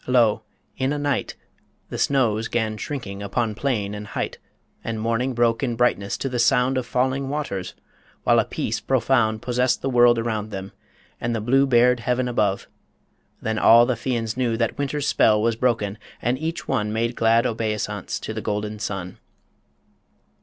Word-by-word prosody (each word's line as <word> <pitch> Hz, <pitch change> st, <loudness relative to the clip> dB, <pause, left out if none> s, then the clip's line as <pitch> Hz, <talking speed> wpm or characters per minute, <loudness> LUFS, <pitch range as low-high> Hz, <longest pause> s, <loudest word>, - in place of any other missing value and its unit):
Lo! 120 Hz, -4 st, +3 dB, 0.4 s
in 130 Hz, +1 st, +1 dB
a 145 Hz, -, -1 dB
night 145 Hz, -1 st, -1 dB, 0.5 s
The -, -, -5 dB
snows 115 Hz, -5 st, +1 dB
'gan 110 Hz, -2 st, -1 dB
shrinking 105 Hz, -6 st, -5 dB
upon 110 Hz, +2 st, -1 dB
plain 105 Hz, -4 st, -1 dB
and 105 Hz, 0 st, -7 dB
height, -, -, -4 dB, 0.4 s
And 115 Hz, -1 st, -3 dB
morning 115 Hz, +3 st, -1 dB
broke 115 Hz, -1 st, +2 dB
in 125 Hz, -4 st, -1 dB
brightness 115 Hz, -4 st, +1 dB
to -, -, -3 dB
the 125 Hz, -2 st, -2 dB
sound 125 Hz, +2 st, +3 dB
Of 130 Hz, -2 st, -2 dB
falling 130 Hz, +2 st, 0 dB
waters, 140 Hz, -11 st, -4 dB, 0.5 s
while -, -, +4 dB
a -, -, +2 dB
peace -, -, -3 dB
profound 115 Hz, -4 st, +1 dB
Possessed 125 Hz, 0 st, +1 dB
the 135 Hz, -, 0 dB
world 120 Hz, -1 st, +5 dB
around 110 Hz, -2 st, -2 dB
them, 95 Hz, -2 st, -6 dB, 0.5 s
and 120 Hz, 0 st, -1 dB
the -, -, -1 dB
blue 135 Hz, +5 st, +3 dB
Bared 125 Hz, -1 st, +4 dB
heaven 125 Hz, +1 st, 0 dB
above... 105 Hz, -5 st, 0 dB, 0.8 s
Then 110 Hz, 0 st, -1 dB
all 120 Hz, +1 st, +7 dB
the 125 Hz, -, +1 dB
Fians 115 Hz, -2 st, -2 dB
knew 120 Hz, -3 st, 0 dB
That 115 Hz, -1 st, 0 dB
Winter's 145 Hz, 0 st, -1 dB
spell 105 Hz, -1 st, +4 dB
was 115 Hz, +1 st, +1 dB
broken, 110 Hz, -4 st, 0 dB, 0.2 s
and 120 Hz, +1 st, 0 dB
each 165 Hz, +2 st, -4 dB
one 105 Hz, -5 st, 0 dB
Made 115 Hz, +2 st, -1 dB
glad 115 Hz, +1 st, +3 dB
obeisance 105 Hz, -3 st, -2 dB
to -, -, -5 dB
the -, -, -4 dB
golden 105 Hz, 0 st, -3 dB
sun. 95 Hz, -3 st, -5 dB
115 Hz, 170 wpm, -23 LUFS, 110-125 Hz, 0.8 s, all